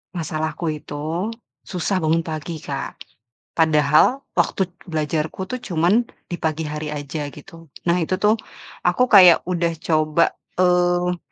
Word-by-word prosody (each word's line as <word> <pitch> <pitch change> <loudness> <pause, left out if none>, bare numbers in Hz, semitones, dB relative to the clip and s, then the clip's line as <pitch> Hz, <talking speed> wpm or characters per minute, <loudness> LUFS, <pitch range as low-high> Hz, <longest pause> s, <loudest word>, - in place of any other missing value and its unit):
Masalahku 160 0 -2
itu 155 +5 -4 0.4
susah 185 +1 -1
bangun 165 0 +1
pagi 160 0 -5
Kak, - - -5 0.6
padahal 155 - +4 0.2
waktu 190 -2 +1 0.2
belajarku 155 0 -2
tuh 255 - -2
cuman 190 +2 +1 0.2
di 175 - -3
pagi 160 -1 -2
hari 150 0 -4
aja 145 +1 -4
gitu, 165 0 -13 0.2
nah 170 - +4
itu 175 +1 -1
tuh 210 +2 +4 0.5
aku 245 +8 +3
kayak 180 -5 +8
udah 170 -2 0
coba, 155 0 +2 0.3
eee, 180 0 +2
165 Hz, 125 wpm, -21 LUFS, 155-180 Hz, 0.6 s, kayak